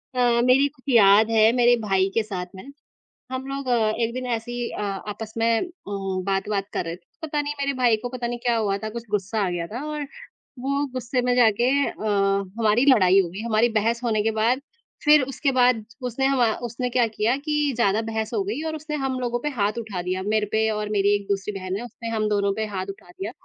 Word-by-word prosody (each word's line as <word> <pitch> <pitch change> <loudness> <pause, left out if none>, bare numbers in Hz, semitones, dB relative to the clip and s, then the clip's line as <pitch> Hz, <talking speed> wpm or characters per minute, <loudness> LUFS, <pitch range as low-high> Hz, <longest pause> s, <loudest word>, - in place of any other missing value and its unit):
अ, 240 -1 +3
मेरी 265 +3 +5
कुछ 285 -3 -17
याद 210 +1 +6
है 220 0 +5
मेरे 240 0 +6
भाई 195 -1 +2
के 225 - +2
साथ 185 -4 -4
है, - - -10 0.7
हम 260 +1 -4
लोग 275 0 -5
अ, 230 -3 +2
एक 230 +1 -1
दिन 255 0 -4
ऐसी 225 +2 -9
ही 235 - -2
अ - - -5
आपस 210 +2 -5
में 230 0 +2
अ, 365 - -4 0.2
बात-वात 195 +1 -2
कर - - -2
रहे 165 +1 -4
थे, - - -21 0.2
पता 300 -2 -1
नहीं 290 0 -3
मेरे 280 0 0
भाई 235 -2 +5
को 245 - -3
पता 245 -1 -4
नहीं 240 0 -4
क्या 240 - +3
हुआ 200 -3 0
था, 215 +2 -5
कुछ 235 +1 -7
गुस्सा 205 +1 0
आ - - -1
गया 170 -1 -3
था 245 - -6
और 295 -2 -4 0.5
वो 280 +2 0
गुस्से 250 0 -1
में 250 0 +1
जाके 235 -1 +4 0.2
अ, - - -8 0.7
हमारी 225 +4 +3
लड़ाई 195 -8 +6
हो 180 - +1
गई। 185 +4 -8
हमारी 230 +1 +3
बहस 225 +2 0
होने 220 -3 +1
के 225 - +1
बाद 230 +5 +1 0.4
फिर 300 -1 +6
उसके 270 +2 -1
बाद 250 -3 +3 0.2
उसने 255 +3 -1
हमा 270 -3 +3 0.2
उसने 250 +2 -3
क्या 245 -1 +2
किया 220 +3 0
कि 300 +1 -3 0.2
ज़्यादा 220 -2 +2
बहस 220 -1 -3
हो - - +1
गई 390 -6 -3
और 315 - -3
उसने 305 0 -5
हम 260 -1 -1
लोगों 240 -1 -1
पे 295 +4 -2
हाथ 205 +2 0
उठा 210 -6 -5
दिया, 185 +1 -2
मेरे 210 +1 +1
पे 220 0 +2
और 210 0 -3
मेरी 200 -1 +3
एक 200 -1 -4
दूसरी 200 +1 -1
बहन 185 0 -4
है, 235 - -6
उसने 230 0 -8
हम 215 -1 0
दोनों 200 -1 +1
पे 220 +1 -1
हाथ 185 0 -2
उठा 195 -2 -17
दिया। 200 +5 -6
225 Hz, 235 wpm, -24 LUFS, 205-250 Hz, 0.7 s, याद